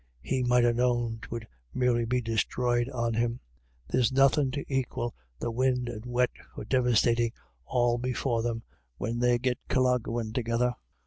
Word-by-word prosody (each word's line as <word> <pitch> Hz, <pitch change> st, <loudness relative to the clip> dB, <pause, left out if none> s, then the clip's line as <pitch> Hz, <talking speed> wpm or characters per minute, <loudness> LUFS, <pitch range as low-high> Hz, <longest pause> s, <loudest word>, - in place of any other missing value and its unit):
He 130 Hz, -, 0 dB
might 125 Hz, 0 st, +4 dB
ha' 120 Hz, 0 st, +4 dB
known 120 Hz, -2 st, +1 dB
'twould 115 Hz, 0 st, -6 dB, 0.3 s
merely 120 Hz, -2 st, +2 dB
be 125 Hz, +2 st, 0 dB
disthroyed 120 Hz, +2 st, 0 dB
on 120 Hz, -3 st, -1 dB
him. 120 Hz, +2 st, 0 dB, 0.5 s
There's 120 Hz, -, +2 dB
nothin* 135 Hz, +1 st, +4 dB
to 140 Hz, +2 st, -3 dB
aquil 130 Hz, -3 st, -2 dB, 0.3 s
the 120 Hz, -, -2 dB
win' 125 Hz, +1 st, +1 dB
and 115 Hz, -3 st, -5 dB
the 125 Hz, -, -9 dB
wet 125 Hz, 0 st, +2 dB, 0.2 s
for -, -, -6 dB
devastatin' 120 Hz, -2 st, +3 dB, 0.4 s
all 120 Hz, -1 st, +2 dB
before 125 Hz, -1 st, 0 dB
them, 115 Hz, -1 st, -2 dB, 0.3 s
when 115 Hz, +7 st, -2 dB
they 120 Hz, 0 st, +3 dB
get 125 Hz, 0 st, -1 dB
colloguin' 120 Hz, -3 st, +1 dB
together." 120 Hz, +1 st, +1 dB
120 Hz, 155 wpm, -28 LUFS, 115-125 Hz, 0.5 s, might